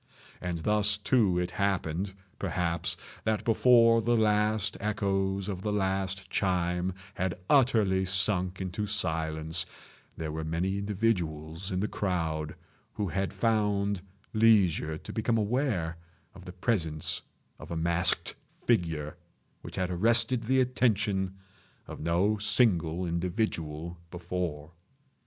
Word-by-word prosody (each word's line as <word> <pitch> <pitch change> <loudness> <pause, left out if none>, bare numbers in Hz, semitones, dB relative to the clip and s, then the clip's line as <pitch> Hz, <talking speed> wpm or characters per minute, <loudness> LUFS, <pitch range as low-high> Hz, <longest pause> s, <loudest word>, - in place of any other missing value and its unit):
And 90 -2 -2
thus, 105 0 +2
too, 105 -4 +2
it 90 0 -1
happened, 95 -1 -1 0.2
perhaps, 90 -1 -1 0.3
that 110 -1 0
before 115 0 +5
the 120 +1 +2
last 105 -1 +2
echoes 100 -2 -1
of 95 -3 -4
the 105 - -1
last 95 -1 -1
chime 90 -1 0 0.2
had 90 -2 -2
utterly 110 -9 +3
sunk 95 0 +1
into 95 +3 -3
silence, 80 -4 -1 0.5
there 80 -1 -3
were 80 +1 -4
many 90 +5 -1
individuals 95 -4 -1
in 90 0 -1
the 105 - 0
crowd 80 -7 -2 0.4
who 105 -3 -2
had 95 +4 -1
found 105 -3 +1 0.3
leisure 100 -8 +4
to - - -9
become 115 +1 +1
aware 105 - 0 0.4
of 95 -2 -13
the 90 - -8
presence 85 -6 -1 0.4
of - - -10
a 85 - -3
masked 85 +2 +2 0.2
figure 80 -9 -1 0.4
which - - -9
had 90 -1 -1
arrested 115 +5 +3
the 130 +3 +3
attention 105 -6 +1 0.5
of - - -9
no 90 +7 +1
single 90 -6 +3
individual 85 -2 -2
before. 85 -3 -4
95 Hz, 120 wpm, -29 LUFS, 85-105 Hz, 0.5 s, before